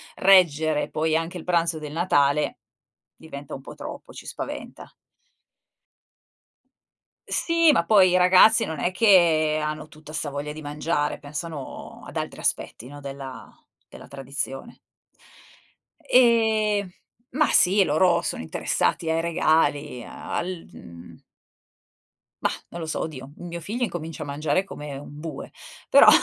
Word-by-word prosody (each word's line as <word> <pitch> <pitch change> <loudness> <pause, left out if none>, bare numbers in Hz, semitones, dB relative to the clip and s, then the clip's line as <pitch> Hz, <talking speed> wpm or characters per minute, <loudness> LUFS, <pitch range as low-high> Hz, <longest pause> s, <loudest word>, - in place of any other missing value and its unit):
reggere 160 -5 +4
poi 160 0 0
anche 165 +3 -2
il 165 - -8
pranzo 170 -2 0
del 150 -1 -7
Natale, 150 -4 +1 0.6
diventa 145 -3 -10
un 135 - -9
po' - - -11
troppo, 295 -1 -9
ci - - -11
spaventa. - - -7 2.4
Sì, 335 -2 +3
ma 170 -11 +2
poi 195 -3 +6
i 180 - +3
ragazzi 185 +5 +6
non 160 -2 -5
è 175 - 0
che 170 -7 +4
hanno 155 0 -4
tutta 155 -1 -14
'sta 155 -1 -3
voglia 145 +1 -5
di 155 - -9
mangiare, 150 0 -2
pensano 145 0 -7
ad - - -8
altri - - -4
aspetti, 120 - -2
no, 145 +2 -10
della 135 -3 -8 0.4
della - - -13
tradizione. 135 - -6 1.3
E 220 -4 +3 0.4
ma 300 +4 +2
sì, 195 +2 +4
loro 170 +2 +3
sono - - -3
interessati 120 - -1
ai 160 0 +1
regali, 155 -5 +1
al 180 -1 -5
mhmm 85 +1 -13 1.2
Mah, - - +2 0.2
non 170 - -8
lo 160 - -5
so, 155 - -3
oddio, 140 -3 -7
mio 170 -1 -7
figlio 225 +9 -3
incomincia 165 -8 -4
a - - -8
mangiare 145 +5 0
come 145 -7 -8
un 145 +1 -10
bue, 160 0 -7 0.4
però. - - +7
160 Hz, 135 wpm, -24 LUFS, 145-185 Hz, 2.4 s, però